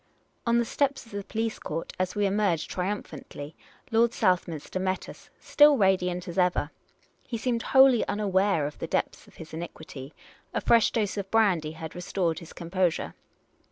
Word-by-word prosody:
On 235 0 +4
the 235 - +2
steps 280 +3 -1
of 230 - -17
the 200 -1 -4
police 225 +2 -3
court, 165 +2 -5
as 185 +1 -1
we 205 0 +1
emerged 195 -5 0
triumph 195 +3 -3
antly. 145 +2 -9 0.4
Lord 230 +1 +3
Southminster 180 -4 0
met 185 0 -2
us - - -12
— - - -38
still 295 -1 +5
radiant 180 -3 +1
as 175 +1 -3
ever. 180 -4 +1 0.5
He 235 - -5
seemed 235 0 -1
wholly 265 -2 +5
unaware 195 -5 +1
of 145 - -6
the - - -4
depths - - -2
of - - -19
his 160 0 -11
iniquity; 155 -4 -8 0.4
a - - +1
fresh 230 -2 +4
dose 210 -3 -1
of 195 -1 -4
brandy 185 -9 +2
had 160 -1 -8
restored 175 -2 -2
his 170 - -12
composure. 175 0 -1
190 Hz, 175 wpm, -27 LUFS, 170-225 Hz, 0.5 s, still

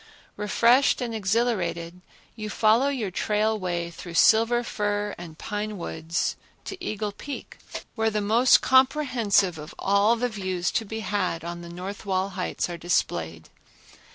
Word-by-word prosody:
Refreshed 235 +6 +3
and 240 -2 -3
exhilarated, 190 -5 -1 0.3
you 215 -1 -5
follow 225 +5 +3
your 245 -9 -2
trail 215 +3 0
way 175 -2 -2
through 170 0 -9
silver 230 +5 +5
fir 205 -2 -2
and 165 -2 -10
pine 210 +2 -4
woods 165 -1 -2 0.3
to 370 -2 -7
Eagle 215 - -3
Peak, 275 +7 -8 0.3
where 220 -1 +1
the 215 -1 -1
most 225 +5 +5
comprehensive 255 - +3
of 150 +1 -9
all 200 +3 +3
the 245 +1 0
views 185 -5 -2
to 225 - -1
be 220 +2 -5
had 190 -5 -1
on 170 0 -6
the 170 - -9
north 185 +4 -7
wall 190 -1 0
heights 185 -1 -3
are 175 -1 -6
displayed. 80 - -1
205 Hz, 150 wpm, -25 LUFS, 180-225 Hz, 0.3 s, silver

